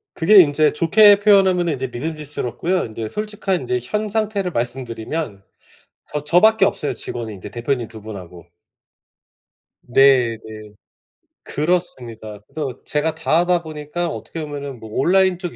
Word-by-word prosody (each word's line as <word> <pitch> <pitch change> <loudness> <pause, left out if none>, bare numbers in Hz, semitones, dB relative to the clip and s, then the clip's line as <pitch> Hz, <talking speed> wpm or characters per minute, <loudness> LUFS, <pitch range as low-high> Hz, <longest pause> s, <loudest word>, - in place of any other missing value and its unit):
그게 200 +6 +5
인제 150 -1 +2
좋게 200 +6 +6
표현하면은 190 -5 +4
인제 130 -1 -3
믿음직스럽고요. 150 +4 -3
인제 110 0 -6
솔직한 210 - -3
인제 125 0 -1
현 210 - -3
상태를 205 -4 -1
말씀드리면 120 -2 -4 0.7
저 150 - -1
저 170 +4 +4
밖에 220 -2 +5
없어요 150 -6 -1
직원이, 115 -3 -6
인제 95 - -10
대표님 120 -1 -2
2 110 -3 -12
분하고. 90 -5 -10 1.4
네 125 -2 +4
네. 110 0 -9 0.8
그렇습니다. 125 - -3
그래서 140 -6 -6
제가 155 +2 -1
다 160 0 +1
하다 175 -1 +1
보니까 155 +2 -4
어떻게 115 +6 -6
보면은 140 -4 -6
뭐 110 - -10
온라인 185 - +3
쪽 175 -2 -6
150 Hz, 320 characters per minute, -20 LUFS, 120-180 Hz, 1.4 s, 좋게